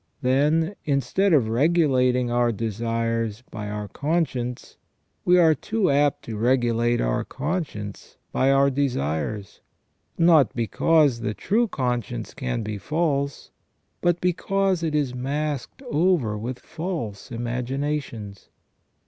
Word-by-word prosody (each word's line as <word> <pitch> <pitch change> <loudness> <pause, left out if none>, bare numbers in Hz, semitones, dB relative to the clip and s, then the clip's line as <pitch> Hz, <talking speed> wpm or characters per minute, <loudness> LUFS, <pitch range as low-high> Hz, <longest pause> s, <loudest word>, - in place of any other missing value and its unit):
Then, 150 +7 +2
instead 145 +8 +1
of 140 -9 +4
regulating 125 -2 +2
our 120 0 +2
desires 115 +1 -2
by 105 -1 -5
our 105 0 -4
con 160 - 0
science, 125 -3 -6 0.5
we 180 0 +5
are 165 -3 +6
too 210 +4 0
apt 145 0 +2
to 110 -2 -6
regulate 120 0 +2
our - - 0
conscience 140 - -5
by 135 - +2
our 135 0 +4
desires, 100 - -2 0.6
not 165 -6 +5
because 140 +3 +3
the 105 -2 -3
true 230 +4 +1
conscience 120 - -3
can 125 -3 -3
be 105 -1 -4
false, 145 - -1 0.5
but 175 -1 +2
because 190 +1 +1
it 160 -2 -1
is 140 -4 0
masked 145 - -3
over 165 - +1
with 120 +4 -4
false 155 - -5
imaginations. 120 -3 -4
130 Hz, 120 wpm, -24 LUFS, 115-155 Hz, 0.6 s, are